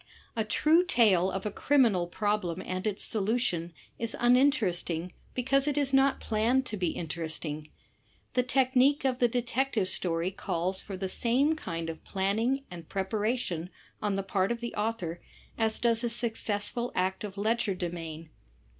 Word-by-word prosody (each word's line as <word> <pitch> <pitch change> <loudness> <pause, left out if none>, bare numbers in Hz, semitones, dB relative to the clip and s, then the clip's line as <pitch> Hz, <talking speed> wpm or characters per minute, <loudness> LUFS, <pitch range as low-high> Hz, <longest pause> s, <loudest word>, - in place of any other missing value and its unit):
A 225 - +1
true 305 +10 +4
tale 210 - +4
of 190 +1 -4
a 210 - -1
criminal 225 -10 +3
problem 205 -2 -1
and 185 +3 -2
its 205 -1 -2
solution 205 -6 0 0.3
is 230 -1 -3
imin 250 +3 +6
teresting 175 - -2 0.2
because 270 +3 +2
it 295 -1 0
is 275 -2 +1
not 270 0 +4
planned 235 +5 +1
to 215 - -4
be 180 -4 0
interesting. 155 -2 -4 0.6
The 250 - +3
technique 260 +2 +3
of 255 -1 +1
the 245 - +5
detective 245 -3 0
story 175 -1 -1
calls 185 0 -2
for 195 -2 -7
the 190 0 -2
same 255 +10 +2
kind 165 - -4
of 165 -1 -6
planning 225 +8 0
and 170 -2 -9
preparation 195 -3 -1 0.3
on 205 -2 0
the 195 - -1
part 195 +1 0
of 235 - -2
the 235 0 -5
author 210 -6 -2 0.3
as 220 -1 +1
does 230 0 +2
a 240 - +1
successful 230 0 -1
act 190 +2 0
of 200 -2 -6
legerdemain. 175 -7 -2
210 Hz, 155 wpm, -29 LUFS, 180-245 Hz, 0.6 s, imin